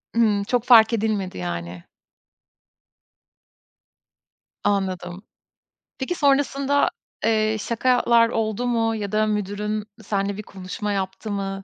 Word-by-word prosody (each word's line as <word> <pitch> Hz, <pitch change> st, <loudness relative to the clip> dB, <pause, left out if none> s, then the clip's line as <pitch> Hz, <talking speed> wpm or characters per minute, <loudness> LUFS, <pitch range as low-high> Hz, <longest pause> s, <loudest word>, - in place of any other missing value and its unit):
Hımm. 210 Hz, -3 st, +3 dB
Çok 245 Hz, +2 st, 0 dB
fark 230 Hz, -2 st, +7 dB
edilmedi, 210 Hz, -, -1 dB
yani. 85 Hz, 0 st, -5 dB, 2.8 s
Anladım. 190 Hz, -2 st, -1 dB, 0.7 s
Peki 285 Hz, +7 st, -3 dB
sonrasında, 280 Hz, 0 st, +2 dB, 0.4 s
eee, 220 Hz, -1 st, +2 dB
şakalar 235 Hz, 0 st, +3 dB
oldu 225 Hz, +1 st, -1 dB
mu 225 Hz, -2 st, +1 dB
ya 205 Hz, -2 st, -4 dB
da 215 Hz, 0 st, +2 dB
müdürün 210 Hz, +1 st, -2 dB, 0.2 s
senle 200 Hz, 0 st, -1 dB
bir 210 Hz, -, -6 dB
konuşma 195 Hz, +2 st, -5 dB
yaptı 195 Hz, +2 st, -3 dB
mı? 195 Hz, -1 st, -3 dB
215 Hz, 105 wpm, -23 LUFS, 195-230 Hz, 2.8 s, fark